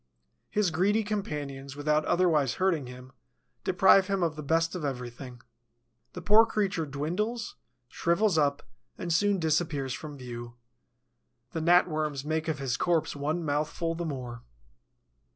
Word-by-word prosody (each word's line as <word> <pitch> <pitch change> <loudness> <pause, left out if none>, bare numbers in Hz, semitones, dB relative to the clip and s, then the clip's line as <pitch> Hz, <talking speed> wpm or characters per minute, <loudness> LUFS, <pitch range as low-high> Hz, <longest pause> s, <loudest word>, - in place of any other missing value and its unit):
His 205 -4 +1
greedy 200 +7 +2
companions, 145 -10 -4
without 150 +1 +1
otherwise 155 -8 +2
hurting 175 -8 +1
him, 125 +1 -11 0.5
deprive 190 +1 +5
him 195 -2 0
of 165 -2 0
the 155 - -6
best 165 +3 +1
of 180 -4 -5
everything. 125 -2 -6 0.7
The 180 - -7
poor 210 +5 +7
creature 195 -7 -1
dwindles, 190 - -3 0.3
shrivels 175 - +1
up 145 -2 +1 0.3
and 170 -2 -2
soon 205 +3 +3
disappears 155 -5 0
from 150 0 -7
view. 120 -2 -8 1.0
The 160 - -3
Gnat 175 +3 +5
worms 155 -4 -2
make 160 +1 -1
of 160 -2 -1
his 135 -3 -2
corpse 170 -4 +1
one 155 +4 -2
mouthful 155 +3 -1
the 170 +1 -4
more. 125 -5 -5
155 Hz, 140 wpm, -28 LUFS, 140-180 Hz, 1.0 s, poor